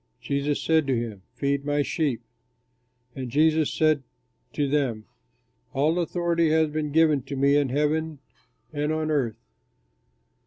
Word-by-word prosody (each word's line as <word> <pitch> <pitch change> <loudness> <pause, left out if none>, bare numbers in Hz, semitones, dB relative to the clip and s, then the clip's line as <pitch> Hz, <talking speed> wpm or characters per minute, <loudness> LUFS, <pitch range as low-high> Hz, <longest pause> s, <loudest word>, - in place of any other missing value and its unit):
Jesus 140 +1 -1
said 160 -3 +2
to 130 -3 +1
him, 110 -4 -5
"Feed 140 0 -1
my 145 0 +1
sheep." 140 -6 -1 0.9
And 130 -2 -5
Jesus 155 +3 +3
said 155 -2 +2 0.5
to 145 - 0
them, 135 -7 -1 0.7
"All 155 +6 +2
authority 170 -1 +1
has 160 -1 +2
been 150 -1 -2
given 155 -2 +4
to 140 - -7
me 140 +1 +3
in 145 -2 +2
heaven 150 +3 0 0.6
and 150 +1 -1
on 155 0 -1
earth. 130 -7 0
145 Hz, 140 wpm, -25 LUFS, 140-155 Hz, 0.9 s, given